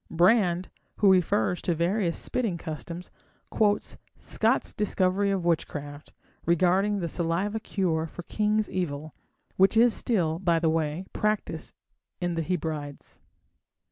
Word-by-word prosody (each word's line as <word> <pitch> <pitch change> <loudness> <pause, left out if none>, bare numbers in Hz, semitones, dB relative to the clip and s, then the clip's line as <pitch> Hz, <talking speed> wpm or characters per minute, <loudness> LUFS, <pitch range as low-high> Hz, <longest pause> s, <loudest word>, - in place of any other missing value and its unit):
Brand, 180 0 +3 0.3
who 200 -2 +5
refers 180 -4 +2
to 175 - 0
various 170 +1 0
spitting 225 -9 -1
customs, 170 +2 -7 0.4
quotes 210 -1 +1 0.2
Scot's - - 0
Discovery 200 -1 +1
of 190 -3 -1
Witchcraft 145 -3 -2 0.3
regarding 185 +4 +2
the 170 - -1
saliva 180 +6 -1
cure 170 -7 -1
for 175 - -9
king's 210 +3 0
evil, 155 -4 -3 0.4
which 195 +4 +4
is 235 0 +6
still, 170 -8 0
by 175 -3 +2
the 165 -1 +2
way, 160 +2 -1
practised 210 -6 -2 0.4
in 175 -1 -1
the 165 - -1
Hebrides. 155 -4 -4
175 Hz, 125 wpm, -27 LUFS, 165-200 Hz, 0.4 s, is